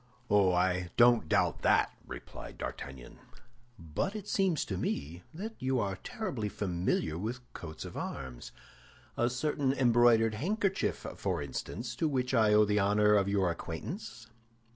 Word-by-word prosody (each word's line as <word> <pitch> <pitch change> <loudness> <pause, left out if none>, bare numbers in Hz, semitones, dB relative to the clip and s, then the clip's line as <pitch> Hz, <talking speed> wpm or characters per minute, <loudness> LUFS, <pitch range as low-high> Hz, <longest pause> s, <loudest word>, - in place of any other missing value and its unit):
"Oh, 100 -3 +5
I 90 0 +1
don't 120 -9 +5
doubt - - +2
that," - - +3 0.2
replied - - -9
D'Artagnan; 65 -3 -7 0.6
"but 85 - -3
it 210 -2 -6
seems 190 -7 +1
to 95 - -3
me 85 -1 -3
that 205 +8 -6
you 130 0 0
are 100 -3 -1
tolerably 120 - -4
familiar 85 -5 -1
with 115 +6 -4
coats 80 -2 -8
of - - -8
arms—a 65 - -6
certain 135 +1 0
embroidered 120 -3 +4
handkerchief, 195 - -1
for - - -1
instance, 115 - -5
to 160 - +1
which 130 -3 -1
I 110 -3 +4
owe 105 0 +6
the 105 0 +2
honor 105 +1 +4
of 100 -1 +3
your 95 -3 +2
acquaintance?" 115 - -6
105 Hz, 140 wpm, -31 LUFS, 90-130 Hz, 0.6 s, owe